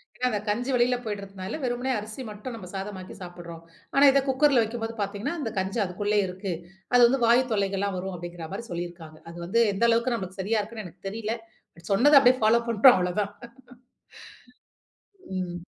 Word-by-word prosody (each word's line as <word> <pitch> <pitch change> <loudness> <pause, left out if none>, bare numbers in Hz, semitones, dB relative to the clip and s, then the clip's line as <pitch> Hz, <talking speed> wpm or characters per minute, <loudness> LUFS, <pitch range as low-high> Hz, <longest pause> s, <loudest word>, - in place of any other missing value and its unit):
ஏன்னா 250 - 0
அந்த 210 - -1
கஞ்சி 245 +5 -1
வெளில 245 +1 +3
போயிடுறதனால 200 +2 -5
வெறுமனே 245 +1 -1
அரிசி 215 +5 -8
மட்டும் 210 +4 -7
நம்ப 190 -5 -9
சாதமாக்கி 190 -1 -6
சாப்பிடுறோம். 170 -2 -9 0.3
ஆனா 275 - +5
இத 275 - +4
குக்கர்ல 265 -1 +4
வைக்கும்போது 225 0 -4
பாத்தீங்கன்னா, 200 +8 -3
அந்த 230 - -2
கஞ்சி 190 +4 -2
அதுக்குள்ளயே 205 +3 0
இருக்கு. 185 +1 -5 0.4
அது 245 - +6
வந்து 265 0 0
வாயு 240 +3 +5
தொல்லைகள்லாம் 200 -1 0
வரும். 190 +1 -4
அப்படிங்கிற 175 -1 -7
மாரி 235 +4 -5
சொல்லியிருக்காங்க. 170 -2 -6
அது 170 - -11
வந்து 230 +6 +2
எந்த 195 - -2
அளவுக்கு 235 +2 +2
நம்மளுக்கு 190 -2 -7
சரியா 215 +3 +1
இருக்குன்னு 215 0 -8
எனக்கு 180 +3 -10
தெரியல, 220 +1 -3 0.4
பட் 170 0 -13
சொன்னத 280 +7 +6
அப்படியே 255 0 +5
பாலோ 235 +2 +5
பண்றோம் 235 +3 +7
அவ்வளதான். 185 +3 -1 2.0
ம். 175 -1 -3
205 Hz, 170 wpm, -26 LUFS, 185-235 Hz, 2.0 s, பண்றோம்